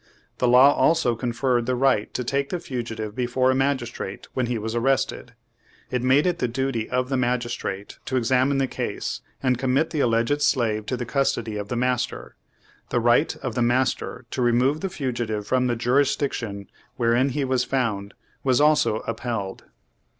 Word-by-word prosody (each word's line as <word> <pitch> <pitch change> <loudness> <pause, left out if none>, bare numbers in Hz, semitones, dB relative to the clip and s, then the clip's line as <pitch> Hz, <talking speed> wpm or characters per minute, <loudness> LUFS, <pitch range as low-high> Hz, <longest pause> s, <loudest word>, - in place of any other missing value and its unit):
The 125 - +2
law 130 +4 +7
also 160 -7 +2
con 120 +1 -2
ferred 120 0 0
the 130 - +1
right 125 -5 +2
to 125 - -1
take 140 +3 -1
the 180 - -2
fugitive 115 -7 -5
before 130 +1 +1
a - - +1
magistrate 130 -7 -2
when 125 -2 0
he 120 -1 -1
was 110 +1 -4
arrested. 130 +3 0 0.6
It 125 - 0
made 130 +5 +4
it 175 -2 0
the 125 - +1
duty 120 -2 -2
of 125 0 -1
the 135 - 0
magistrate 120 -5 -2
to 130 - -1
examine 130 +3 +2
the 135 - +2
case, - - -4 0.2
and 125 -2 +2
commit 135 +4 +1
the 155 - -2
alleged 120 +3 +2
slave 115 -7 +1
to 125 - -1
the 120 - -4
custody 120 -3 -1
of 105 -1 -4
the 120 - -3
master. 125 0 -2 0.5
The - - +1
right - - +3
of - - -2
the - - -1
master 125 +1 0
to - - -2
remove 125 +5 +2
the 195 - -2
fugitive 120 - -3
from 125 +3 +1
the 120 - 0
jurisdiction 120 -5 0 0.3
wherein 120 +3 +2
he 140 +1 -1
was 130 -1 +1
found, 105 -7 -2 0.3
was 130 -1 +3
also 150 -7 +3
upheld. 115 -4 -4
125 Hz, 180 wpm, -24 LUFS, 115-135 Hz, 0.6 s, law